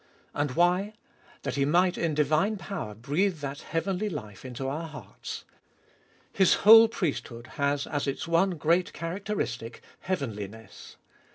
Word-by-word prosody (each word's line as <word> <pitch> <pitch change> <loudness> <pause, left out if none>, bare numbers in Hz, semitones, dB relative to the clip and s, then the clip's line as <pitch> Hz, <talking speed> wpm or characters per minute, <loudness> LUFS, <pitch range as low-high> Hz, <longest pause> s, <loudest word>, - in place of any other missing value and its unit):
And 145 -3 -1
why? 180 +5 +2 0.5
That - - -2
He 140 - +3
might 175 +5 +3
in 165 -3 -1
divine 155 +8 +2
power 170 - -6
breathe 160 - 0
that 145 0 -5
heavenly 190 +5 -2
life 110 - -7
into 130 +1 -5
our 160 +4 -3
heartu 150 -1 -8 0.9
His 190 -2 +5
whole 225 +1 +10
priesthood 145 - -3 0.2
has, 140 0 +1
as 145 -1 -2
its 140 - -3
one 170 +2 +2
great 170 +4 +1
characteristic, 165 - -4 0.2
heavenli 125 - -3
ness. 110 0 -13
155 Hz, 140 wpm, -28 LUFS, 135-185 Hz, 0.9 s, whole